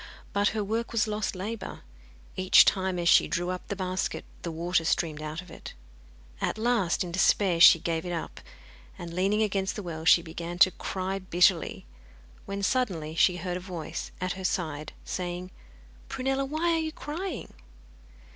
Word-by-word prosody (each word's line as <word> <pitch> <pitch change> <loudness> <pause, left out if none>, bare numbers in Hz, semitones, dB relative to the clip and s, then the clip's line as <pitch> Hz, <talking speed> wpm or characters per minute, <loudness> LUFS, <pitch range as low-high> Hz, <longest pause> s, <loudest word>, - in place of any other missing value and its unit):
But 205 0 +2
her 215 0 -1
work 225 +3 -2
was 225 -2 +1
lost 210 -2 -2
labour. 205 +4 -5 0.5
Each 185 0 +6
time, 190 -1 +1
as 170 -1 -1
she - - +6
drew 175 +1 -1
up 180 -1 -6
the 200 - -3
basket, 185 -1 -3 0.2
the 170 - -4
water 170 +1 0
streamed 160 -2 0
out 155 +3 -5
of 180 - -15
it. - - -10 0.7
At - - -1
last, 220 -6 +1
in 175 - -6
despair, 185 0 +3
she 165 - +9
gave 165 0 -2
it 180 - -5
up, 170 -2 -5 0.6
and 170 -1 -7
leaning 195 +4 +2
against 195 -2 -1
the 210 - -5
well 160 -3 -6
she 165 +1 +6
began 170 +1 -6
to 185 +1 +6
cry 190 +1 -3
bitterly, 180 -1 +2 0.6
when 200 0 -4
suddenly 185 -10 0
she 180 +2 +3
heard 180 0 -3
a - - -5
voice 175 -3 -6
at 185 0 -2
her 190 - -8
side 155 -5 -2
saying 180 0 -4 0.6
'Prunella, 270 +1 -1
why 315 +5 0
are 330 - +2
you 315 0 -2
crying? 335 +5 -6
185 Hz, 175 wpm, -28 LUFS, 170-210 Hz, 0.7 s, she